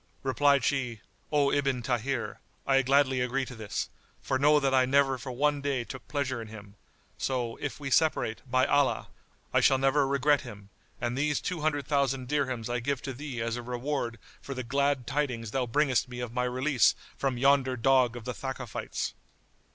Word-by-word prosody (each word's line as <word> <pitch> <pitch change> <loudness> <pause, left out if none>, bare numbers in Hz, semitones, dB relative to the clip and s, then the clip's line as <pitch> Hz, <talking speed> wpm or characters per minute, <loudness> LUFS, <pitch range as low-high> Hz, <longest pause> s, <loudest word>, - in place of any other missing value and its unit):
Replied 140 0 +3
she, 125 -4 -1 0.3
"O 145 -2 +3
Ibn 135 -4 0
Tahir, 125 0 -2 0.3
I 135 -1 +4
gladly 135 -1 +3
agree 130 +2 0
to 125 - -9
this; 110 -4 -4 0.3
for 130 - -1
know 150 +2 +5
that 135 -1 +1
I 130 -1 +5
never 135 0 +3
for 130 +1 -6
one 145 +3 +1
day 140 -3 -1
took 130 +2 -9
pleasure 135 -4 -2
in 115 - -8
him; 105 -2 -11 0.5
so, 125 -3 -1
if 145 - -5
we 135 -2 -5
separate, 155 -8 +2
by 130 +1 +3
Allah, 145 -1 +2 0.4
I - - +5
shall 135 - +5
never 135 +1 +3
regret 140 +1 +3
him, 100 -1 -11 0.3
and 120 0 -2
these 145 +1 +1
two 180 -4 -3
hundred 145 -3 0
thousand 135 -3 0
dirhams 130 -6 -1
I 120 0 -1
give 140 +1 -2
to 135 - -4
thee 130 -2 -5
as 115 +1 -2
a - - -4
reward 125 0 -3 0.2
for 135 - -6
the 130 - -3
glad 140 +1 0
tidings 125 -6 -2
thou 130 0 -1
bringest 130 0 +2
me 125 -1 -7
of 120 -2 -5
my 125 0 0
release 130 0 +3 0.2
from 135 -3 -1
yonder 135 0 +3
dog 125 0 +3
of 120 -2 -8
the 125 - -3
Thakafites." 130 -3 -4
130 Hz, 190 wpm, -29 LUFS, 125-140 Hz, 0.5 s, know